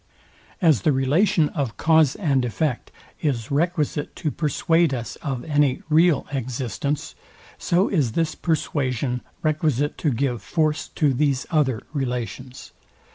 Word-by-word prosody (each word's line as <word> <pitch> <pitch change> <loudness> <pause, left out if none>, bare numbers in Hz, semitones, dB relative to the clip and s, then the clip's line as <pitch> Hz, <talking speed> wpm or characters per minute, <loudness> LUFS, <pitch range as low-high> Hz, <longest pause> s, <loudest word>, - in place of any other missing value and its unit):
As 155 - +5
the 155 - +3
relation 150 +6 +2
of 130 - -3
cause 160 -3 +4
and 140 -9 +1
effect 125 +2 -2 0.3
is 130 -7 -1
requisite 150 -1 -1
to 155 -5 -2
persuade 165 0 +1
us 115 -6 -5
of 135 -4 -4
any 145 -4 +1
real 160 0 +4
existence, 135 +3 -3 0.5
so 180 +4 +2
is 140 - 0
this 165 +2 0
persuasion 130 -6 -1 0.2
requisite 150 -2 0
to 155 - +1
give 125 -3 -1
force 155 - 0
to 145 -4 +2
these 140 0 +1
other 135 -8 +1
relations. 125 -2 -4
145 Hz, 130 wpm, -23 LUFS, 130-155 Hz, 0.5 s, As